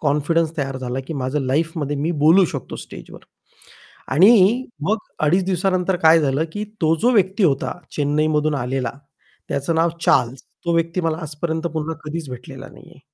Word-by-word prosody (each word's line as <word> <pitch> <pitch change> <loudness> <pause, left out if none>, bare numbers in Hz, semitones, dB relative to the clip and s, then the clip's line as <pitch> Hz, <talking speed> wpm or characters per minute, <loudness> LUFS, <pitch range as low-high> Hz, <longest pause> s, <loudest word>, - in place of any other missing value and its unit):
Confidence 155 +3 0
तयार 135 -2 -3
झाला, 130 0 -3
की - - -3
माझं 135 +2 -2
लाईफमध्ये 145 +2 -1
मी 155 +4 -1
बोलू 180 +4 +6
शकतो - - -6
स्टेजवर - - -11 0.9
आणि 210 - +5 0.2
मग 215 - +3 0.3
2.5 180 +4 +3
दिवसानंतर 185 0 0
काय 160 +1 +6
झालं, 140 +2 +1
की 210 0 -3 0.2
तो 160 0 +4
जो 245 - +4
व्यक्ती 195 0 +2
होता, 135 -5 +1 0.2
चेन्नईमधून 150 +1 +1
आलेला, 130 0 -2 0.6
त्याचं 140 +4 -1
नाव 165 +1 +2
चार्ल्स. 125 -4 +2 0.2
तो 170 - 0
व्यक्ती 165 +2 0
मला 165 -2 -1
आजपर्यंत 160 +2 -3
पुन्हा 160 +1 -2
कधीच 155 0 -5
भेटलेला 125 0 -9
नाहीये. - - -16
160 Hz, 155 wpm, -21 LUFS, 145-175 Hz, 0.9 s, बोलू